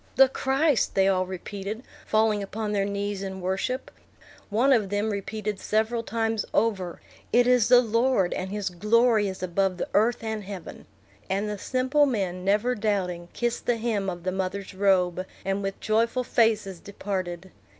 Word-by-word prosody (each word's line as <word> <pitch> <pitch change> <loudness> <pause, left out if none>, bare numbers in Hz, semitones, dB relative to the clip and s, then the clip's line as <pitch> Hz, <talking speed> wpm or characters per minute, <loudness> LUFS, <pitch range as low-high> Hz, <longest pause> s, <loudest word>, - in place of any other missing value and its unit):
"The 265 0 +7
Christ!" 270 +1 +1
they 195 0 +4
all 185 -1 +2
repeated, 200 +4 -6 0.2
falling 215 -1 +2
upon 210 +2 -4
their 200 -1 +1
knees 200 0 -3
in 190 -1 -5
worship. 190 +8 -2 0.6
One 240 +6 +4
of 215 -6 +2
them 205 +2 0
repeated 205 0 -4
several 220 +2 0
times 225 -1 -1
over, 195 -5 0 0.3
"It 245 +1 +5
is 250 -3 +4
the 245 0 +7
Lord, 230 -4 +2
and 185 0 -4
his 200 -1 -3
glory 215 +3 +3
is 190 -1 -6
above 185 +1 0
the - - -3
earth 225 +3 +2
and 220 -1 -3
heaven." 190 -3 -8 0.4
And 195 +2 0
the 210 -1 -4
simple 260 +5 +2
men, 190 -7 -2
never 210 +6 +2
doubting, 190 -6 -2
kissed 240 0 -2
the 240 -1 +2
hem 215 -4 -1
of 175 -2 -6
the 185 - -1
mother's 190 +1 -3
robe, 185 -2 +2 0.2
and 195 +1 0
with 195 0 -4
joyful 230 +3 +1
faces 215 -6 +1
departed. 190 -2 -5
205 Hz, 165 wpm, -26 LUFS, 190-230 Hz, 0.6 s, The